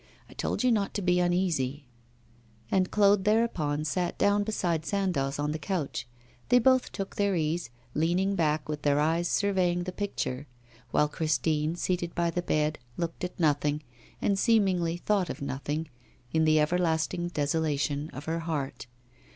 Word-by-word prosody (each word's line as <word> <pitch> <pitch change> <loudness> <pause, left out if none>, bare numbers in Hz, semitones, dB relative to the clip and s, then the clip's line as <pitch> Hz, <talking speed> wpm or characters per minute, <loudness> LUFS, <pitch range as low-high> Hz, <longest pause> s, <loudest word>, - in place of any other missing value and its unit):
I - - -14
told - - -2
you 250 - +4
not 205 -4 0
to 205 - -1
be 180 0 +3
uneasy.' 170 -6 0 0.9
And 185 -1 +2
Claude 200 -2 +4
thereupon 180 -9 +1
sat 175 +3 -1
down 205 0 +3
beside 175 -7 -1
Sandoz 170 -8 -1
on 145 +1 -1
the 155 - -3
couch. 160 -9 -3 0.4
They 245 - +6
both 255 +1 +3
took 195 0 -5
their 200 -1 +2
ease, 160 -2 -1 0.2
leaning 175 +5 +1
back, 155 -4 0
with 150 -1 -4
their 145 0 +2
eyes 165 +3 +2
surveying 180 -3 +1
the 185 - -4
picture; 150 -9 -3 0.4
while 150 - +3
Christine, 155 +1 0
seated 175 -1 -2
by 170 -1 +1
the 175 - -1
bed, 155 -2 0 0.2
looked 170 0 -3
at 180 - -5
nothing, 150 -1 +1 0.4
and 195 -1 +1
seemingly 190 -8 +2
thought 190 -1 0
of - - -5
nothing, 145 +3 -3 0.5
in 160 0 +3
the 155 0 +4
everlasting 165 +1 +1
desolation 150 -2 -1
of 135 - -9
her 165 +1 -1
heart. 150 -6 -4
170 Hz, 160 wpm, -28 LUFS, 150-190 Hz, 0.9 s, They